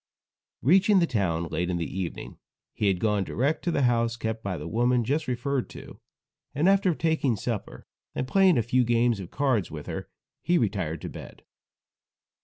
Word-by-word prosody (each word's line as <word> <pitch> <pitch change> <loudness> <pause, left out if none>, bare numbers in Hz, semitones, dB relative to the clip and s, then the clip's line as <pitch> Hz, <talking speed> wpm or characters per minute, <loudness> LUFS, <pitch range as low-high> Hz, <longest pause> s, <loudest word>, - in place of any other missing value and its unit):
Reaching 190 - +5
the 175 - +4
town 90 - 0
late 85 +2 -2
in 90 - -1
the 85 - -2
evening, 95 -1 -6 0.3
he 105 - 0
had 95 -2 +2
gone 105 -2 +1
direct 135 - -1
to - - +1
the 145 -5 +1
house 115 -1 +1
kept 110 -1 -3
by 95 -3 -3
the 75 +2 -6
woman 120 +5 +2
just 145 +7 -1
referred 130 +1 -1
to, - - -11 0.6
and 150 +6 +2
after 195 -3 +3
taking 160 -7 +1
supper 110 0 -5 0.3
and 130 - -2
playing 190 0 +4
a 115 - +2
few 125 +3 +2
games 120 -1 +2
of 90 -3 -7
cards 130 - 0
with 75 -2 -8
her, - - -6 0.3
he 175 +1 +2
retired 95 - -1
to - - -5
bed. - - -11
120 Hz, 185 wpm, -26 LUFS, 100-145 Hz, 0.6 s, Reaching